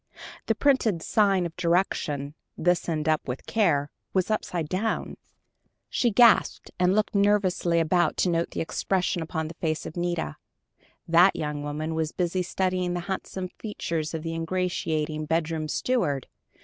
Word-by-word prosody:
The 225 - +2
printed 225 - +2
sign 195 -4 +3
of 165 - -6
direction, 170 -5 0 0.2
"This 175 +1 +1
End 155 -1 -1
up 155 -1 +1
with 125 +1 -5
Care," 150 -10 +1 0.2
were 185 - +4
upside 175 -6 -1
down! 195 +7 -2 0.8
She 240 - +2
gasped, 235 0 +4
and 180 +1 +3
looked 215 0 +1
nervously 200 -4 +2
about 170 +1 +2
to - - +2
note 170 0 0
the - - -4
expression 180 +1 -1
upon 160 -1 -3
the 160 - -8
face 155 -2 -1
of - - -7
Nita. 175 - -2 0.7
That 175 +3 +6
young 150 -1 -3
woman 150 +2 -3
was 160 -1 -2
busy 180 +1 0
studying 180 -1 -1
the 175 - -2
handsome 190 0 -4
features 165 -7 -3
of 160 - -4
the 165 0 -3
ingratiating 160 -3 -2
bedroom 160 -1 -1
steward. 150 - 0
170 Hz, 150 wpm, -26 LUFS, 155-185 Hz, 0.8 s, That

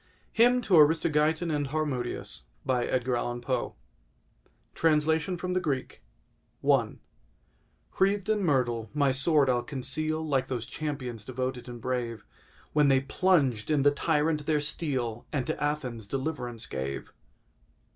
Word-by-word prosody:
HYMN 245 +2 +5
TO 185 -6 +4
ARISTOGEITON 155 +1 +3
AND 145 -2 0
HARMODIUS 135 - -3 2.3
Translation 160 +2 +2
from 180 +1 -3
the 185 - +2
Greek 145 -7 -3 0.7
I - - +3 1.0
Wreathed 195 +1 +2
in 215 -2 +1
myrtle, 120 - +1
my 140 -2 +3
sword 140 +2 +3
I'll 125 -1 +2
conceal 155 +5 -2
Like 135 -3 +1
those 120 -3 -3
champions 130 -7 -5
devoted 130 0 -4
and 120 -1 -7
brave, 120 -2 -3 0.5
When 150 -1 +4
they 135 -1 +4
plunged 135 -7 +1
in 150 -3 +2
the 145 - +6
tyrant 150 0 0
their 155 -2 +3
steel, 135 -7 -2
And 135 -5 -1
to - - -3
Athens 125 -8 -2
deliverance 130 -3 -3
gave. 70 +1 -5
145 Hz, 120 wpm, -28 LUFS, 125-155 Hz, 2.3 s, the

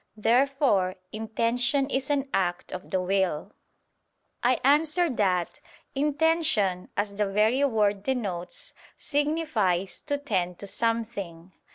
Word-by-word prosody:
Therefore 235 -5 +2 0.2
intention 230 +5 0
is 265 +1 -1
an 285 -1 0
act 175 -2 -1
of 185 +1 -7
the 190 - 0
will. 190 -1 -1 0.9
I 245 0 +2
answer 305 +4 +3
that, 185 -7 0 0.3
Intention, 290 - +1
as 205 0 -1
the 210 -1 +1
very 215 +7 +2
word 210 -6 +1
denotes, 195 -8 -4 0.2
signifies, 285 - 0
"to 285 -1 0
tend 185 -11 -2
to - - -7
something." 200 -6 -2
220 Hz, 110 wpm, -27 LUFS, 190-275 Hz, 0.9 s, answer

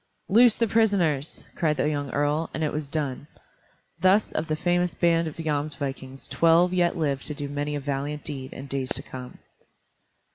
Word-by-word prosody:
"Loose 230 +3 +6
the 230 - +2
prisoners!" 190 -10 +1
cried 155 -3 0
the - - +1
young 145 -2 -2
earl, 145 +4 0
and 160 - -2
it 150 - -1
was 150 -1 -3
done. 145 -1 -3 0.7
Thus 190 +3 +3
of 160 - -2
the 155 - 0
famous 175 +2 0
band 165 -1 +2
of 155 - -6
Jomsvikings 145 -4 -3
twelve 170 +2 +4
yet 175 -1 +2
lived 140 -4 -1
to 150 - -4
do 145 0 -4
many 145 +1 -3
a - - -2
valiant 145 +1 -3
deed 135 -3 -6
in 135 - -8
days 135 -1 -3
to - - 0
come. 125 -1 -9
150 Hz, 180 wpm, -25 LUFS, 140-170 Hz, 0.7 s, Loose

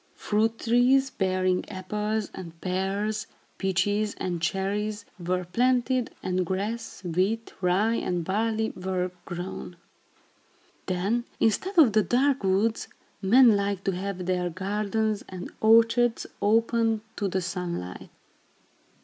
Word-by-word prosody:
Fruit 220 +2 0
trees, 255 +4 +3
bearing 185 -1 +1
apples 210 +2 -3
and 165 -3 -9
pears, 195 +4 -2 0.3
peaches 205 +3 0
and 175 -2 -3
cherries, 205 +4 -1
were 180 +1 -1
planted, 250 +4 +1
and 185 0 0
grass, 205 +5 -4
wheat, 190 +6 -1
rye 200 +6 +2
and 175 -2 -2
barley 220 +3 0
were 185 -1 -2
grown. 175 0 -6 1.1
Then, 200 +6 0
instead 365 - +1
of 275 -10 +7
the 215 - +5
dark 260 +5 +2
woods, 200 +4 +1 0.3
men 230 +3 +6
liked 200 -1 -1
to 195 - +2
have 185 0 -4
their 180 -1 0
gardens 210 +4 -1
and 185 -1 -7
orchards 230 +2 +4 0.2
open 225 +1 +2
to 205 - -1
the 190 0 0
sunlight. 175 - -5
200 Hz, 115 wpm, -27 LUFS, 185-225 Hz, 1.1 s, of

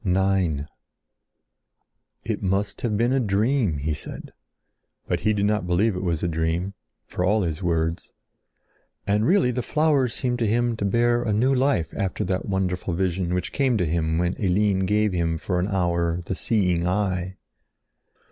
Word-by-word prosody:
IX 95 -5 +1 1.6
"It - - -2
must 100 +2 -1
have 110 -4 0
been 120 +3 +2
a 135 - +2
dream!" 110 - +1
he 75 +3 -2
said. - - -8 0.7
But - - 0
he 110 - +1
did 100 -1 +1
not 105 -3 0
believe 95 +4 +2
it 90 - -3
was 85 -4 -1
a - - +1
dream—for 85 +3 -3
all 105 +3 +2
his 80 -1 -3
words. 85 -2 -1 0.9
And 105 +2 +1
really 175 -8 +3
the 125 +1 -2
flowers 145 -4 +1
seemed 125 -2 -1
to 115 - +1
him 120 +2 +1
to 100 - -2
bear 120 +3 +2
a 110 -3 -1
new 125 +6 +3
life 130 - +1
after 95 -3 -2
that 90 0 -2
wonderful 90 -2 -1
vision 90 -1 -1
which 90 -1 -3
came 130 -4 +2
to 90 - +1
him 80 0 0
when 90 +1 +1
Eline 95 0 +2
gave 105 0 +2
him 85 -2 0
for 90 +2 -2
an 90 - 0
hour 85 -3 0
the - - -3
seeing 90 -4 +1
eye. 95 -1 -1
95 Hz, 165 wpm, -24 LUFS, 85-110 Hz, 1.6 s, really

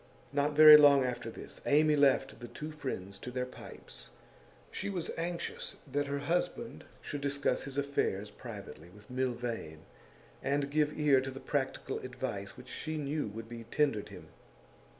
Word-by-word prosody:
Not 145 +1 +1
very 155 0 +11
long 140 -2 +7
after 125 -2 -3
this, - - -9
Amy 150 +1 +5
left 135 -2 +3
the 120 - -7
two 150 +5 -7
friends 100 -10 -5
to - - -7
their 125 0 -2
pipes; 60 - -11 0.6
she 200 - -3
was 180 -4 -3
anxious 170 +1 -4 0.2
that 145 +1 0
her 140 0 -1
husband 175 +10 -2 0.2
should 145 - -5
discuss 140 0 0
his 140 0 -7
affairs 105 -8 -1
privately 85 -4 -9
with 105 +5 -16
Milvain, 120 -11 -3 0.6
and 140 0 0
give 150 0 +1
ear 145 -3 +5
to 130 - -4
the 135 0 -7
practical 135 -1 -2
advice 125 -6 -5
which 125 - -12
she 155 +4 -4
knew 150 -1 -2
would 110 +2 -7
be 115 0 -8
tendered 130 -3 0
him. - - -11
140 Hz, 160 wpm, -32 LUFS, 120-150 Hz, 0.6 s, very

